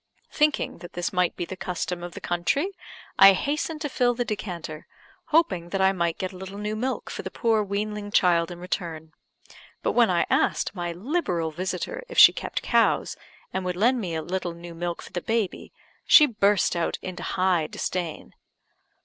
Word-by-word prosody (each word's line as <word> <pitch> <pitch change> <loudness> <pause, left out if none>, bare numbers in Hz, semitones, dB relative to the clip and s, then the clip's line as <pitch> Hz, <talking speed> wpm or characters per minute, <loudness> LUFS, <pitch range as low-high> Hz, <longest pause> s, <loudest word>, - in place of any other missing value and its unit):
Thinking 300 - +1
that 175 0 -11
this 175 +3 -3
might 180 -1 +1
be 175 - -3
the 190 - -7
custom 180 -1 -4
of 175 0 -7
the - - -6
country, 225 - 0 0.5
I 195 0 +10
hastened 305 - -2
to 300 - -1
fill 245 -2 +1
the 245 0 -1
decanter, 175 -8 -5 0.4
hoping 320 - +1
that 195 - -2
I 190 0 +4
might 170 -3 -1
get 185 - -3
a - - -10
little 190 +1 -8
new 210 +1 -3
milk 255 +4 -3
for - - -5
the - - -6
poor 225 -3 +1
weanling 205 +1 -3
child 170 -4 +3
in 175 - -8
return; 165 -3 -5 0.7
but - - +1
when - - +4
I - - +2
asked - - +1
my 175 -3 -3
liberal 180 - -2
visitor 190 - -4
if 485 - -8
she - - +10
kept - - -4
cows, - - +2 0.4
and 190 - -2
would 180 -1 -2
lend 240 +6 +2
me 175 -5 -3
a 160 - -3
little 175 -1 -3
new 170 0 -10
milk 170 +1 -4
for - - -13
the 175 - -2
baby, 225 -2 -2 0.4
she 300 - +9
burst 210 -8 +2
out 170 -1 -1
into 185 -1 -6
high 180 -4 +1
disdain. 175 0 -4
185 Hz, 190 wpm, -25 LUFS, 175-215 Hz, 0.7 s, I